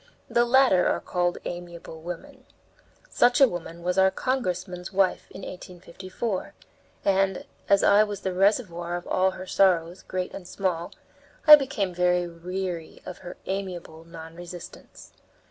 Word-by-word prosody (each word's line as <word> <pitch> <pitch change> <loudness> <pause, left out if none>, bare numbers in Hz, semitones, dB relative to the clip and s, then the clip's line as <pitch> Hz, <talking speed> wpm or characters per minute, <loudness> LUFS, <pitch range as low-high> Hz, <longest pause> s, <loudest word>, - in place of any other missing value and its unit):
The 240 0 +4
latter 245 -7 +4
are - - +1
called 175 0 -1
amiable 170 -2 -7
women. 175 +1 -8 0.6
Such 245 - +3
a 270 - +8
woman 170 -4 -7
was 180 +2 +1
our 190 0 +6
congressman's 185 -7 -3
wife 190 -1 +1
in 190 - -10
1854, 185 +3 -6 0.5
and, 195 -1 +1 0.2
as 200 0 +4
I 205 +1 +6
was 205 -2 -5
the 190 - -2
reservoir 180 -3 +1
of 175 - -5
all 185 +1 +2
her 185 - -7
sorrows, 180 -2 +2
great 185 0 -4
and 180 -3 -8
small, 180 -3 -2 0.5
I 300 -1 +13
became 265 -10 -2
very 180 0 +2
weary 175 0 -5
of 185 - -8
her 175 - -9
amiable 180 -4 -5
non 165 -1 -11
resistance. 175 0 -11
180 Hz, 145 wpm, -26 LUFS, 175-195 Hz, 0.6 s, I